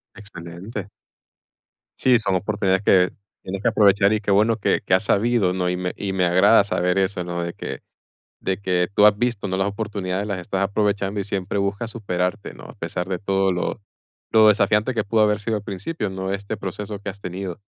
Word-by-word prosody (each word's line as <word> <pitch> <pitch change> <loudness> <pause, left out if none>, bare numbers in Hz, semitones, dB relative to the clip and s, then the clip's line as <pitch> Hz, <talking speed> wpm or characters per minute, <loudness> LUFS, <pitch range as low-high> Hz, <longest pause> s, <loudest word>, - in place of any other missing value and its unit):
Excelente. 100 +1 -8 1.1
Sí. 125 -3 +4
Son 95 -4 +1
oportunidades 100 -1 0
que 90 -2 +4 0.3
tienes 95 +1 -5
que - - 0
aprovechar, 100 -2 +4
y, 105 - +1
qué 100 -1 -2
bueno 110 +3 +3
que - - +1
que 90 - -1
has 95 - +4
sabido, 105 -3 +2
¿no? 90 -1 -1
Y 90 - -1
me 90 0 -3
y 95 -1 -3
me 90 -1 +2
agrada, 100 +4 +5
saber 90 -1 0
eso, 95 -2 0
¿no? 85 0 -4
De 85 - -4
que - - -7 0.6
de 95 -1 -2
que 90 -2 0
tú 105 - +5
has 105 -1 +6
visto, 115 -4 -1
¿no? 95 0 -2
Las 95 +1 +1
oportunidades, 100 -2 -3
las 95 -3 -3
estás 95 +2 -3
aprovechando, 100 0 0
y - - -1
siempre 100 0 -3
buscas 100 +4 -2
superarte, 90 - -3
¿no? 60 0 -13
A - - -11
pesar, 90 +1 -4
de 95 -2 -3
todo 95 -1 +1
lo 90 +5 -3 0.5
lo 110 -1 +6
desafiante, 105 +4 +3
que 110 - +1
pudo 110 +2 +1
haber 105 -1 +3
sido 110 +1 -1
al 105 - -8
principio, 100 - -4
¿no? 95 0 -4
Este 100 +2 -4
proceso 100 +1 -5
que 100 - -6
has 100 +1 -10
tenido. 90 +1 -6
100 Hz, 205 wpm, -22 LUFS, 95-105 Hz, 1.1 s, has